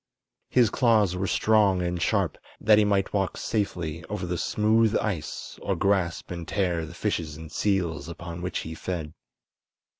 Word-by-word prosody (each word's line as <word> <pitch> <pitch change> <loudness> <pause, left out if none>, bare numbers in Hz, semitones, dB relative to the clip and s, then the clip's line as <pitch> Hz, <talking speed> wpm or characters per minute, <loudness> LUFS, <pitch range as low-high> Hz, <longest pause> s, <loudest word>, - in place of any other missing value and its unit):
His 120 -5 +4
claws 110 -7 +3
were 95 +2 -1
strong 100 -4 +3
and 85 0 -2
sharp, - - +1 0.2
that 110 -1 +5
he - - +5
might 100 -2 +1
walk 95 -2 0
safely 85 -7 -2
over 100 -3 -4
the 90 0 -2
smooth 110 +4 +2
ice 90 -8 -4
or - - -1
grasp 95 -5 0
and 85 -2 -5
tear 85 -5 0
the 85 - -11
fishes 85 -7 -2
and 80 -1 -10
seals 90 -6 0
upon 85 0 -7
which 90 +1 -3
he 80 - -5
fed. 80 -2 -4
90 Hz, 160 wpm, -26 LUFS, 85-105 Hz, 0.2 s, that